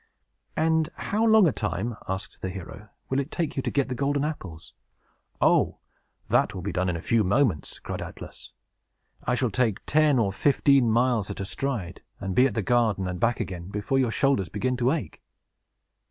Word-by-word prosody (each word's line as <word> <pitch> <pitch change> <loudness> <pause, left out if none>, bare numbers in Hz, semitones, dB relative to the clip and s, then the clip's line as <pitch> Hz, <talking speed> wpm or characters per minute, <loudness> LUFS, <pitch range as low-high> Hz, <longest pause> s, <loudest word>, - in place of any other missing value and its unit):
"And 160 0 +2
how 215 +2 -1
long 220 -4 +6
a - - +3
time," 105 +3 -3
asked 95 +3 -5
the 95 - -3
hero, 95 +3 -9 0.2
"will 135 - +2
it 140 +1 -3
take 170 -3 -2
you 135 - 0
to - - -2
get 140 -2 +1
the 130 - -3
golden 140 +3 0
apples?" 90 - -7 0.7
"Oh, - - +3 0.5
that - - +2
will 90 - -6
be 100 - -2
done 95 0 0
in 90 - -1
a 85 - -4
few 115 -2 +2
moments," 100 - +1
cried - - -6
Atlas. - - -9 0.7
"I 125 - +1
shall 125 -2 0
take 115 -5 0
ten 150 -2 +3
or 100 -5 +1
fifteen 135 +1 +3
miles 115 -2 +2
at 100 - -6
a 100 - -3
stride, 105 -6 -4 0.2
and 95 0 -3
be 125 +7 +5
at - - -6
the 110 - 0
garden 110 -4 +2
and 90 -1 -4
back 115 -1 +1
again 90 -2 -5
before 105 +7 -1
your 130 -3 +2
shoulders 115 -6 +1
begin 125 +5 -1
to 125 0 +2
ache." 135 - -4
120 Hz, 195 wpm, -26 LUFS, 95-140 Hz, 0.7 s, long